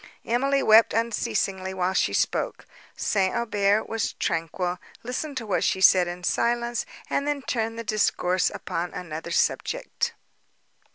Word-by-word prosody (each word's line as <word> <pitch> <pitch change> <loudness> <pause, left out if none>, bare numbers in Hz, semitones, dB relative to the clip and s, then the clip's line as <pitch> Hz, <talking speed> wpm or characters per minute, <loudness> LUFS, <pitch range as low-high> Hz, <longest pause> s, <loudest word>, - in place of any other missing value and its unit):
Emily 275 +4 +1
wept 220 +1 +6
unceasingly 195 -4 -1
while 185 0 0
she - - +2
spoke; - - -1 0.3
St. 190 -2 +1
Aubert 205 -2 +1
was 225 -1 -2
tranquil, 175 +2 -2 0.2
listened 260 +4 -4
to 230 - -4
what 205 - 0
she 190 - +1
said 185 -1 +6
in 175 +1 -6
silence, 235 +4 0 0.2
and 280 - -1
then 290 -2 -1
turned 225 -2 -2
the 230 - -4
discourse 185 -4 +1
upon 175 +1 -4
another 165 -2 -6
subject. 170 - -1
210 Hz, 135 wpm, -25 LUFS, 180-235 Hz, 0.3 s, wept